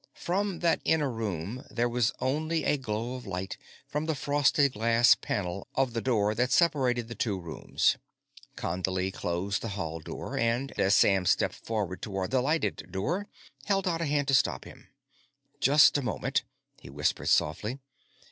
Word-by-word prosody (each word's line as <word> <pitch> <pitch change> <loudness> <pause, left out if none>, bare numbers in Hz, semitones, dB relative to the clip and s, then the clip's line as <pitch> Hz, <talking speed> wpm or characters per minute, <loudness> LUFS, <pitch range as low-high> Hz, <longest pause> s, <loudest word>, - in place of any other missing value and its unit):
From 195 +1 -2
that 170 -1 +2
inner 150 -4 +2
room, 110 0 -4
there 120 0 0
was 120 -2 +1
only 155 +5 0
a - - +2
glow 115 -2 -3
of 125 -4 -8
light 95 0 -4 0.3
from 150 +2 -3
the 160 - 0
frosted 145 -1 +2
glass 115 +2 +5
panel 95 -1 -3
of 130 -3 +1
the 115 - -1
door 105 -5 +1
that 125 +3 +1
separated 130 -8 +2
the 120 - -6
two 105 -5 -1
rooms. 85 -2 0 0.6
Condley 95 +2 -2
closed 95 +4 -2
the - - -4
hall 80 -3 -4
door, 75 - -7
and, 120 +4 0
as 100 +1 +4
Sam 95 -3 +4
stepped - - +2
forward 105 -5 -4
toward 95 -1 -3
the 130 -1 +3
lighted 155 +5 -1
door, 170 - -2 0.4
held 195 -1 +1
out 170 -2 0
a - - 0
hand 145 -1 0
to - - +2
stop 130 - +2
him. - - -14 0.7
"Just 145 +3 +6
a - - -3
moment," 105 - -1 0.3
he 70 - -12
whispered 75 +2 -1
softly. 100 - +1
120 Hz, 165 wpm, -29 LUFS, 95-145 Hz, 0.7 s, Just